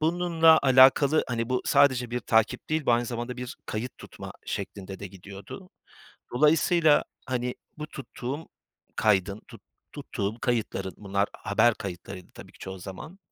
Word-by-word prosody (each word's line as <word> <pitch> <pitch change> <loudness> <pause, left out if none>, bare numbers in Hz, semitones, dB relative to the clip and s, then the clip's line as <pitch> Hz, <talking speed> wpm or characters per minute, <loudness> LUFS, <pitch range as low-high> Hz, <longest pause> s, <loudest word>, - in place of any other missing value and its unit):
Bununla 165 -1 +4
alakalı 135 +3 +6
Hani, 115 -1 -2
bu 125 0 0
sadece 125 -4 +3
bir 125 0 -2
takip 110 -1 +1
değil, 155 -2 0
bu 120 - +5
aynı 120 +1 +2
zamanda 120 +1 -4
bir 125 -1 -6
kayıt 115 +4 -5
tutma - - -10
şeklinde 95 -1 -5
de 100 - -6
gidiyordu. 100 - -11 0.6
Dolayısıyla, 155 +2 +4 0.2
hani, 125 -1 -2 0.2
bu 150 - -5
tuttuğum 140 +1 -7 0.5
kaydın, 100 -1 +2
tut - - -13 0.3
tuttuğum 100 +4 -4
kayıtların, 115 -6 -2
bunlar 100 0 -1
haber 115 +1 +2
kayıtlarıydı 90 0 -8
tabii - - -13
ki - - -20
çoğu 95 0 -7
zaman. 100 - -9
120 Hz, 145 wpm, -27 LUFS, 100-145 Hz, 0.6 s, alakalı